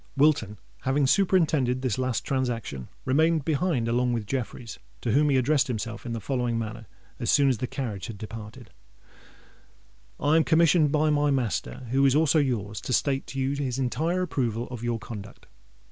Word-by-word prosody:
Wilton, 140 -8 +3 0.2
having 135 +2 +1
superintended 150 -7 +2
this 130 -3 -1
last 130 -2 -1
transaction, 115 - -2 0.2
remained 155 +3 +2
behind 155 -6 0
along 120 +1 +1
with 115 -3 -2
Jeffreys, 120 0 -5 0.2
to 120 - -1
whom 145 +5 +3
he 135 - +3
addressed 135 +2 +2
himself 115 -1 -4
in 115 - -3
the 115 - -3
following 120 -1 -1
manner, 115 -1 -5 0.3
as 120 - -2
soon 140 -2 +5
as 125 -5 0
the 125 - -2
carriage 115 -7 -4
had 115 -4 -7
departed:— 110 +1 -9 1.5
"I 150 +2 +3
am 165 - +4
commissioned 165 -2 +4
by 155 0 +2
my 145 0 +2
master, 120 - -1
who 135 +1 +3
is 135 -1 +4
also 155 0 +4
your's, 110 -7 -1
to 125 - -3
state 135 +2 +1
to 135 - -5
you 135 +1 0
his 135 -3 -2
entire 160 +8 0
approval 120 -8 -1
of 120 -2 -6
your 120 -1 0
conduct. 105 -2 -9
130 Hz, 175 wpm, -26 LUFS, 115-145 Hz, 1.5 s, soon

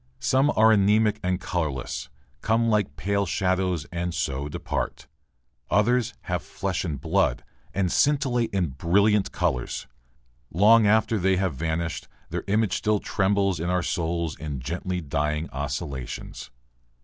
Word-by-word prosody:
Some 135 +3 +2
are 110 +1 +6
anemic 105 +1 +3
and 90 0 0
colourless, 75 -9 -3 0.3
come 115 +1 +2
like 105 -3 +1
pale 100 0 0
shadows 90 -2 0
and 85 0 -3
so 70 -2 -2
depart. 85 +3 -4 0.6
Others 120 +3 +2
have 90 -1 -2
flesh 95 -1 -3
and 75 -6 -3
blood - - +1 0.3
and 95 -3 0
scintillate 135 -5 +2
in 95 -5 0
brilliant 100 +9 +2
colours. 60 -2 -2 0.7
Long 105 +5 +6
after 110 +1 +3
they 95 +1 +2
have 95 -3 0
vanished, 80 +3 -3 0.2
their - - -3
image 105 -1 +1
still 105 -1 +1
trembles 100 -2 +1
in 85 +2 -2
our 90 -1 +1
souls 85 -2 -1
in 75 -2 -5
gently 90 +7 -3
dying 75 +1 -1
oscillations. 70 -2 -5
90 Hz, 135 wpm, -25 LUFS, 80-105 Hz, 0.7 s, are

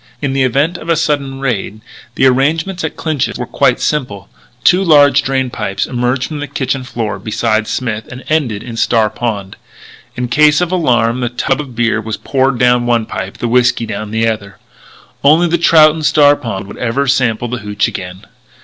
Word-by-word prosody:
In 135 0 -2
the 135 - 0
event 140 +7 +1
of - - -9
a 165 - +3
sudden 145 -4 -1
raid, 110 -5 -2 0.4
the - - +2
arrangements 160 +8 +1
at 160 - -3
Clinch's 155 -5 -2
were - - -4
quite - - +1
simple. 105 -10 -3 0.3
Two 185 +2 +4
large 145 -5 +5
drain 130 0 -1
pipes 100 -4 -3
emerged 125 +1 -1
from 150 +1 -4
the 145 - -4
kitchen 135 -1 -2
floor 110 -6 -4
beside 110 +1 -1
Smith, 115 -4 -3
and 125 +1 -9
ended 130 -10 -1
in 115 -2 -8
Star 110 -2 +2
Pond. 100 -5 -4 0.6
In 125 0 -3
case 150 +4 +4
of 180 -1 -1
alarm 120 -9 +1
the 120 -1 -1
tub 135 +3 -1
of 130 -5 -10
beer 115 -1 +1
was 110 -1 -5
poured 135 -1 0
down 125 0 +2
one 120 -2 +1
pipe; 95 -2 -6
the 120 - -2
whiskey 120 0 +2
down 105 -1 -5
the 110 +1 0
other. 100 -3 -4 0.7
Only 155 +5 +5
the 170 0 0
trout 155 -2 +6
in 160 - -6
Star 145 -1 +4
Pond 100 -7 -5
would 100 - -11
ever 125 +4 -1
sample 125 -3 +1
that 125 -1 -4
hootch 105 0 -1
again. 90 +2 -7
125 Hz, 195 wpm, -14 LUFS, 115-145 Hz, 0.7 s, trout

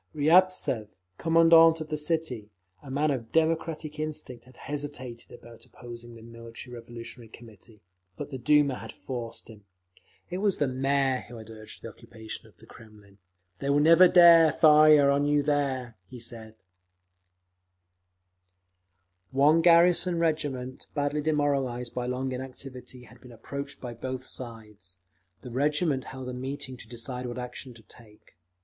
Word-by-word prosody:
Riabtsev, 155 - +3 0.3
Commandant 165 0 +5
of 155 -1 -7
the 155 - -2
city, 150 -9 -2 0.3
a 140 - -12
man 145 +3 0
of 115 -5 -5
democratic 160 -1 -1
instincts, 155 -6 -6
had 130 - -19
hesitated 140 -5 -7
about 115 -1 -14
opposing 120 -1 -12
the 115 - -13
Military 115 +2 -11
Revolutionary 115 0 -10
Committee; 110 -2 -16 0.3
but - - -7
the 130 - -6
Duma 145 0 +2
had - - -9
forced 120 -3 -7
him…. 110 -3 -14 0.6
It 180 +1 -5
was 200 -1 +1
the 145 - +1
Mayor 135 0 0
who 120 - -11
had 110 0 -11
urged 110 -1 -12
the - - -6
occupation 110 -1 -11
of - - -23
the - - -17
Kremlin; 105 -3 -17 0.4
"They 140 - -3
will 140 +1 +3
never 165 +4 +7
dare 170 -3 +7
fire 150 -2 +6
on 140 +1 +1
you 145 0 +2
there," 135 -5 -1
he 125 +2 -11
said…. 110 -2 -9 2.7
One 145 +6 +4
garrison 175 +1 +5
regiment, 145 -6 -2
badly 145 +1 -1
demoralised 140 -5 -1
by 125 -1 -3
long 130 +1 -3
inactivity, 130 0 -9
had 120 +1 -18
been 125 - -14
approached 140 +5 -7
by 120 -2 -7
both 130 +2 -6
sides. 105 -8 -9 0.4
The 125 - -10
regiment 145 +1 0
held 130 -1 -8
a 125 - -5
meeting 130 +1 -5
to 115 - -10
decide 125 +1 -4
what 120 - -6
action 125 0 -7
to 115 - -16
take. 105 0 -19
130 Hz, 150 wpm, -27 LUFS, 120-150 Hz, 2.7 s, never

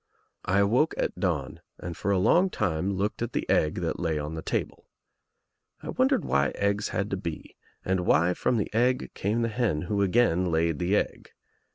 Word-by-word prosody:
THE - - -7
EGG - - +1
63 - - +4
I - - +5
awoke 120 +10 +2
at - - -2
dawn 80 -9 -2 0.2
and 90 -2 -6
for 100 - -3
a 100 - +3
long 175 - +4
time 95 - -1
looked 100 +4 -2
at 120 - -3
the - - -2
egg 75 -1 +2
that 85 - -2
lay 80 -3 -1
on 75 +1 -4
the 80 - -5
table. - - -3 1.0
I - - -6
wondered - - +1
why 70 -2 +2
eggs 100 +1 0
had 100 0 -2
to 95 - -1
be 85 -4 -7 0.3
and 95 0 +1
why 90 0 +3
from 120 - 0
the 105 - -2
egg 125 +3 +1
came 110 +4 -1
the 115 - 0
hen 105 -9 0
who 100 +3 -1
again 95 -3 +2
laid 80 -1 +1
the 90 +3 +1
egg. - - -2
95 Hz, 210 wpm, -27 LUFS, 85-105 Hz, 1.0 s, I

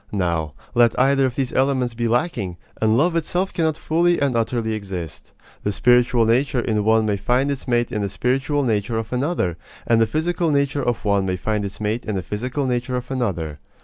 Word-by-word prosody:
Now, 85 -6 -1 0.2
let 120 -1 +3
either 135 +1 +4
of 125 - -5
these 135 -2 -2
elements 130 -2 +1
be 120 0 -1
lacking, 115 - -1 0.2
and 110 0 +3
love 165 +5 +2
itself 175 +3 -1
cannot 160 -4 0
fully 175 +2 +2
and 140 -3 +1
utterly 115 -1 0
exist. 95 -6 -6 0.3
The 105 - -1
spiritual 120 +1 +3
nature 125 +4 +2
in 110 -3 0
one 110 +1 +3
may 105 -2 0
find 125 +8 +1
its 140 -1 -5
mate 120 -1 +1
in 105 -3 -2
the 100 - -1
spiritual 135 +8 0
nature 110 -1 0
of 115 +2 -4
another; 125 - -1 0.3
and 115 -1 +3
the 115 - +4
physical 165 +3 0
nature 140 -1 +1
of 120 -3 -2
one 100 -2 +2
may 90 0 -1
find 105 +2 -1
its 100 0 -6
mate 110 +3 -1
in 110 - -3
the 95 - -2
physical 125 +8 -3
nature 125 0 -1
of 125 +1 -4
another. 85 - -2
120 Hz, 205 wpm, -22 LUFS, 105-135 Hz, 0.3 s, either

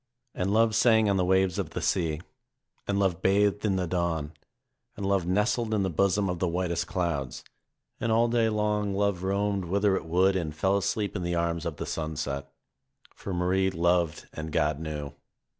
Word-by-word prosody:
And 95 +2 -1
love 110 +1 +3
sang 110 -1 +4
on 100 - +1
the 90 - +2
waves 95 0 +2
of - - -2
the - - -4
sea, 80 -3 0 0.7
and 100 - 0
love 95 -3 +1
bathed 100 +1 +2
in 100 -3 +1
the 90 -1 0
dawn, 85 -3 -2 0.6
and 100 - -4
love 95 -3 +1
nestled 110 +4 +1
in 100 - +1
the 95 - -1
bosom 100 +4 +2
of 90 -2 -2
the 90 - +1
whitest 85 0 -1
clouds, 85 -8 -2 0.6
and 115 - -1
all 115 +1 +4
day 115 -1 +2
long 105 -2 0
love 100 -2 0
roamed 100 0 0
whither 100 +2 +2
it - - -3
would 95 +4 +3
and 80 -4 -2
fell 95 +6 +1
asleep 100 +1 -1
in 95 - -2
the 85 0 -1
arms 85 0 -1
of 80 - -4
the - - -5
sunset. 75 -3 -4 0.6
For 100 - -7
Marie 90 +2 +1
loved 85 -2 0
and 80 0 -6
God 75 -2 +1
knew. 75 -3 -5
95 Hz, 190 wpm, -27 LUFS, 85-100 Hz, 0.7 s, sang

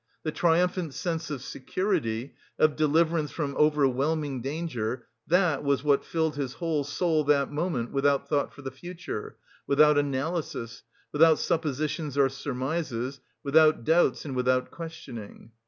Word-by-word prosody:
The 155 - -1
triumphant 175 -1 +1
sense 165 -2 -3
of 140 -4 -5
security, 140 - -2 0.2
of 155 -2 +3
deliverance 155 +1 +2
from 140 -3 -3
overwhelming 145 -1 +1
danger, 130 -5 -3 0.2
that 175 -5 +2
was 140 -2 +1
what 145 -2 +3
filled 160 -3 -1
his 135 -3 -3
whole 160 -4 -1
soul 155 +2 0
that 140 -1 +2
moment 150 -6 -2
without 140 0 +1
thought 145 -2 0
for 145 - -13
the 135 - -5
future, 170 -4 -7 0.3
without 150 +1 +5
analysis, 140 -4 -3 0.3
without 160 +1 +5
suppositions 150 -1 -2
or 135 -1 +4
surmises, 135 -1 -3 0.2
without 155 -1 +4
doubts 165 +5 +2
and 135 -3 -4
without 125 0 +1
questioning. 140 -10 -9
145 Hz, 135 wpm, -27 LUFS, 135-160 Hz, 0.3 s, without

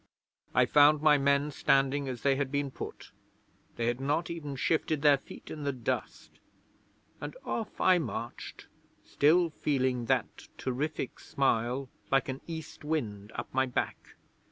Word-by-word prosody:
I 125 +1 +6
found 145 +3 +5
my 150 -2 +6
men 140 +1 +2
standing 135 0 +2
as 125 -3 -6
they 140 -1 +4
had 135 -1 -2
been 140 -1 -1
put - - -8 0.6
they 115 - -1
had 120 +2 0
not 150 +5 0
even 150 -4 -5
shifted 155 +1 0
their 145 -2 +6
feet - - -12
in 150 - -6
the 140 - 0
dust, 125 -4 -4 0.8
and - - -6
off 225 -2 -4
I 185 -1 +5
marched, 120 -7 -6 0.4
still 165 +3 +3
feeling 130 -5 0
that - - -1
terrific 135 +1 -3
smile 130 0 0 0.2
like 135 0 +2
an 130 0 -4
east 160 -2 -7
wind 110 -10 -3
up - - -6
my 130 0 +2
back. 125 - -3
140 Hz, 150 wpm, -30 LUFS, 130-150 Hz, 0.8 s, I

